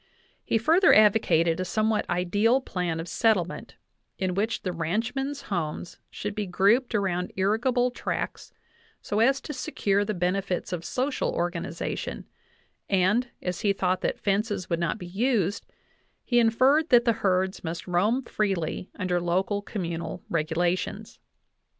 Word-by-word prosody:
He - - +1
further 325 - +5
advocated 180 -6 +4
a - - 0
some 215 +4 0
what 215 - -1
ideal 205 +8 +2
plan 180 -9 -3
of 165 - -5
settlement, 195 -6 0 0.4
in 185 -1 -1
which 215 +5 -1
the 185 - -1
ranchmen's 235 - -2
homes 170 -2 -4
should 205 0 -5
be 210 -1 -3
grouped 215 +7 +2
around 180 -3 -1
irrigable 240 +6 +1
tracts, 245 - -4 0.5
so 210 - -1
as 265 +4 +4
to 300 - -6
secure 205 -8 0
the 210 0 -3
benefits 180 +1 -1
of 175 -2 -3
social 260 +7 -1
organization, 175 -1 -3 0.6
and, 205 +6 +2
as 180 -1 -3
he 200 -2 +2
thought 185 -1 0
that - - -1
fences 200 -2 -1
would 170 - +1
not 170 +4 -1
be 180 - -8
used, 205 0 0 0.6
he 240 -1 +2
inferred 260 +7 +3
that 240 -1 +5
the 235 - +4
herds 190 0 +1
must 165 0 -5
roam 205 +9 +1
freely 195 -6 -2
under 180 -2 0
local 190 +4 0
communal 175 -3 -5
regulations. 175 +6 -1
195 Hz, 145 wpm, -26 LUFS, 180-225 Hz, 0.6 s, further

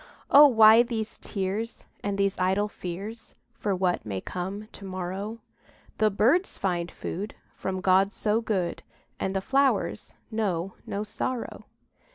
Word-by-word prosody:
Oh, 290 +1 +10
why 225 -2 +8
these 230 -3 -3
tears, 205 +3 -3 0.2
And 200 -1 -1
these 195 -1 +1
idle 190 +3 +2
fears 205 +4 -7 0.2
For 205 -4 -1
what 180 - 0
may 100 -3 -3
come 190 - -5
to - - -12
morrow? 190 +4 -5 0.6
The 215 0 +4
birds 250 - +2
find 175 -2 -1
food 205 +5 -5 0.2
From 190 -1 -4
God 190 +1 +4
so 215 +1 0
good, 190 -6 -1 0.4
And 190 0 -2
the 190 - +1
flowers 275 +5 +1 0.2
know 195 -5 -1
no 200 +1 -2
sorrow. 235 +3 -4
200 Hz, 140 wpm, -27 LUFS, 185-220 Hz, 0.6 s, Oh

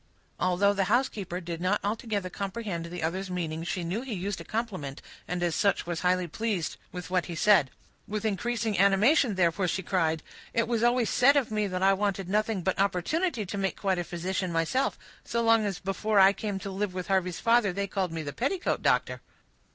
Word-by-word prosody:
Although 185 +3 +3
the 195 -1 +1
housekeeper 205 -5 0
did 170 -1 -6
not 185 +3 +2
altogether 210 -2 -2
comprehend 195 -4 -4
the 175 -1 -6
other's 185 +4 -2
meaning, 165 -3 -3
she 175 +1 -3
knew 180 +7 -2
he 255 -4 -5
used 190 0 -3
a - - -7
compliment, 185 - -4 0.3
and 180 0 -2
as 170 -2 +1
such 200 +4 +1
was 170 -1 -3
highly 180 0 +1
pleased 195 -2 -2
with 180 0 -7
what 180 -1 +1
he 170 - -5
said. 185 -6 +4 0.4
With 210 +1 -3
increased 230 +2 -1
animation, 210 - +4
therefore, 180 +1 +2
she 190 +2 -1
cried, 160 -4 0 0.3
"It 230 - +2
was 230 -2 0
always 240 0 +2
said 280 +3 +5
of 255 -6 +1
me, 210 -1 0
that 185 -1 -2
I 195 0 +6
wanted 195 -2 -1
nothing 210 -1 0
but 190 +1 0
opportunity 215 - 0
to 200 - -5
make 195 -1 -1
quite 190 -3 0
a - - -1
physician 180 +2 -3
myself; 165 +11 0 0.3
so 235 0 -1
long 225 -1 +4
as 195 -4 -3
before 200 +3 -1
I 195 +1 +7
came 205 -1 -3
to 195 - -5
live 190 -1 -3
with 180 -1 -3
Harvey's 185 -3 +1
father, 230 -3 +3
they 200 +2 -2
called 190 -2 -2
me 165 -1 -4
the 145 -1 -5
petticoat 350 +10 -1
doctor." - - +1
195 Hz, 205 wpm, -28 LUFS, 180-215 Hz, 0.4 s, I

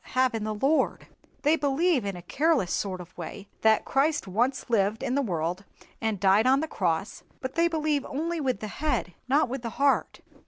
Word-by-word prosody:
have 255 -1 +3
in 225 -2 -2
the 215 0 -2
Lord. 275 +9 +1 0.4
They 300 +2 +4
believe 290 - +1
in 200 -2 -3
a 175 - -9
careless 290 - +1
sort 190 -2 -2
of 180 +1 -13
way 195 +4 -8
that 220 -1 +4
Christ 290 0 +1
once 245 +9 0
lived 220 -1 +1
in 245 - -1
the 280 - +2
world, 175 - -2 0.4
and 220 -3 -1
died 200 +5 +4
on 265 +1 +5
the 315 - -2
cross, 185 - -2 0.2
but 260 -1 -5
they 335 0 +3
believe 305 -4 0
only 330 +4 -2
with 255 -7 -1
the 215 - -3
head, 300 - 0
not 285 +4 +3
with 260 +1 -4
the 235 - -4
heart. 280 0 +1
255 Hz, 200 wpm, -27 LUFS, 200-290 Hz, 0.4 s, on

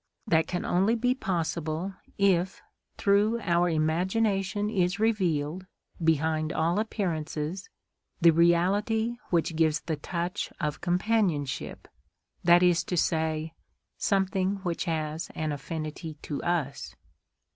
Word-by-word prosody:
That 160 -7 +2
can 175 - -3
only 195 +6 +2
be 245 +2 +2
possible 170 - -2 0.2
if 190 -2 +2 0.3
through 205 +3 +3
our 175 -2 +2
imagination 190 +5 +1
is 190 -2 0
revealed, 185 -6 0 0.4
behind 160 0 +1
all 165 +5 +1
appearances, 175 -5 -3 0.5
the 170 -2 +7
reality 200 +8 +2
which 165 -1 +1
gives 155 -1 +2
the 160 -2 -3
touch 170 +3 -3
of 150 -3 -2
companionship, 180 -6 0 0.6
that 175 +1 +6
is 175 -2 +4
to 180 - -2
say, 160 -1 0 0.4
something 195 -1 +1
which 175 -2 -2
has 155 -1 -2
an 155 -1 -2
affinity 155 +2 -5
to 145 - -4
us. 160 -6 -2
175 Hz, 115 wpm, -28 LUFS, 160-195 Hz, 0.6 s, the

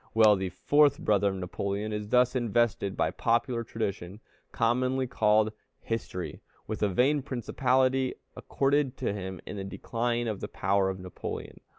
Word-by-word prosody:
Well, 110 -2 +7
the 95 -1 -2
fourth 145 +9 +3
brother 100 -1 +2
of 95 - -3
Napoleon 100 +3 -3
is 105 0 -4
thus 125 +2 +3
invested 120 -4 +1
by - - +1
popular 115 0 0
tradition, 100 -4 -4 0.3
commonly 130 +3 +1
called 110 -3 +2 0.3
history, 110 -5 -4 0.2
with 110 - -5
a 105 - +3
vain 135 +9 +2
principality 130 +1 +1 0.2
accorded 140 -1 0
to - - -1
him 95 -2 -5
in 105 - -6
the 100 - -4
decline 120 +4 -2
of 105 -3 -3
the - - -4
power 95 0 +1
of 95 0 -4
Napoleon. 90 -1 -7
110 Hz, 155 wpm, -28 LUFS, 100-125 Hz, 0.3 s, Well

